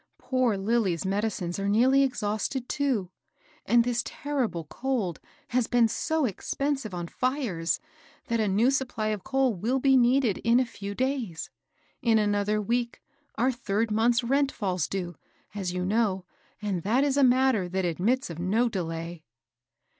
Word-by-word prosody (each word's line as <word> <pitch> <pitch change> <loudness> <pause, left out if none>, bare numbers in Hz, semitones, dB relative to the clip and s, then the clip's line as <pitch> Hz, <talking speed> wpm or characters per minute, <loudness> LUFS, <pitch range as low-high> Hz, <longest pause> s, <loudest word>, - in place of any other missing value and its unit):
Poor 255 -5 0
Lilly's 195 -4 0
medicines 195 -3 -1
are 200 0 -1
nearly 255 +6 +4
exhausted, 245 0 -1
too; 255 -11 -1 0.6
and 240 0 +5
this 240 0 0
ter 285 -1 -2
rible 170 -6 -7
cold 230 - -2 0.3
has 245 -2 +1
been 240 -2 +4
so 315 +7 0
expensive 270 +3 -2
on 175 -1 -4
fires, 245 - -1 0.5
that 230 -1 -1
a 215 - +2
new 215 +7 +3
supply 250 -5 -1
of 210 -3 -3
coal 265 -2 +1
will 225 +8 -1
be 270 0 +4
needed 245 -3 +3
in 235 +2 +3
a 255 - +2
few 200 -3 -7
days. 255 - -2 0.5
In 230 -2 +3
another 205 0 +1
week, 235 +3 -1 0.4
our 255 +3 +2
third 225 -2 -1
month's 235 +3 +3
rent 275 +3 +2
falls 185 -5 -1
due, 175 -4 -4 0.4
as 195 -3 -3
you 180 0 -2
know, 195 -2 +1 0.4
and 195 -4 -1
that 235 - +2
is 280 -2 +1
a 280 - +4
matter 250 -7 +3
that 190 +1 -1
admits 190 - 0
of 165 - -8
no 210 +8 +2
delay." 165 -3 -4
225 Hz, 160 wpm, -27 LUFS, 195-255 Hz, 0.6 s, and